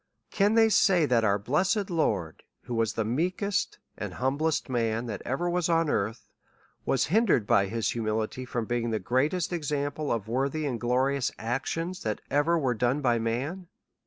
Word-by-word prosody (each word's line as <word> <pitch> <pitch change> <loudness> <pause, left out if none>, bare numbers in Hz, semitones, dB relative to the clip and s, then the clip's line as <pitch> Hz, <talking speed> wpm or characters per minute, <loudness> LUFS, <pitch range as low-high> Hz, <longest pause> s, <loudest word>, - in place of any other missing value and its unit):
Can 205 +2 +2
they 225 -1 +6
say 190 -5 +4
that 120 -4 +2
our 100 -2 +3
blessed 185 - 0
Lord, 100 - -1 0.2
who 120 - -6
was 115 -2 0
the 110 - -1
meekest 180 - -1 0.2
and - - -6
humblest 140 +5 0
man 115 -2 -1
that 105 -4 -5
ever 135 +8 -1
was 175 -1 0
on 165 -2 +2
earth, 110 +3 -2 0.6
was 135 -1 +2
hindered 210 - +3
by 100 -1 +3
his 115 +2 -1
humility 110 +2 -2
from 120 -2 -3
being 120 0 -1
the 110 - 0
greatest 140 - 0
example 145 -2 -2
of 110 -3 -2
worthy 135 +6 -1
and 125 -5 -3
glori 130 +3 +1
ous 130 - 0
actions, 165 +10 -3
that 110 -1 -2
ever 155 +4 +3
were 135 -6 +1
done 125 +5 0
by 120 -3 +2
man 135 +11 -3
130 Hz, 175 wpm, -28 LUFS, 115-165 Hz, 0.6 s, they